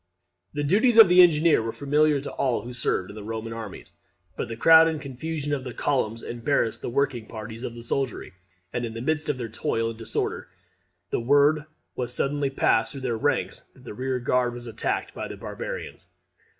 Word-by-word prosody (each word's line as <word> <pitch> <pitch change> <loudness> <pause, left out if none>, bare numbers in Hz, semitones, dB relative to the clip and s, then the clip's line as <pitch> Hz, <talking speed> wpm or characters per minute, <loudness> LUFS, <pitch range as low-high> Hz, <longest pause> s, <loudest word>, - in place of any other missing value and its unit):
The 145 - -1
duties 220 - +3
of 220 -5 +10
the 180 +1 +8
engineer 165 -4 +5
were 115 0 -3
familiar 145 +2 +2
to 145 - -6
all 120 -6 -1
who 125 +1 -7
served 100 -6 -1
in - - -12
the 110 - -7
Roman 115 +1 -5
armies. 110 -3 -8 0.4
But - - -3
the 115 -1 -6
crowd 160 +5 +7
and 160 -2 -1
confusion 145 +2 -4
of 135 -3 -2
the 125 -2 -7
columns 115 -5 -1
embarrassed 120 -1 -1
the - - -4
working 125 -3 -1
parties 110 0 -8
of 120 -2 -5
the 120 - -9
soldiery, 130 0 -3 0.4
and 120 - -2
in 115 -1 -5
the 115 - -5
midst 155 +4 -1
of 145 - 0
their 120 -2 -4
toil 115 +1 -1
and 115 - -12
disorder 115 - -3 0.6
the - - 0
word 145 +5 +3 0.3
was 125 -1 -2
suddenly 140 +1 +1
passed 115 -4 +2
through 135 - -7
their 125 -3 -1
ranks 110 - 0 0.2
that - - -18
the - - -8
rear 130 +3 -2
guard 125 0 0
was 120 0 -8
attacked 115 -1 -2
by - - -5
the - - -8
barbarians. - - -7
125 Hz, 200 wpm, -25 LUFS, 115-145 Hz, 0.6 s, of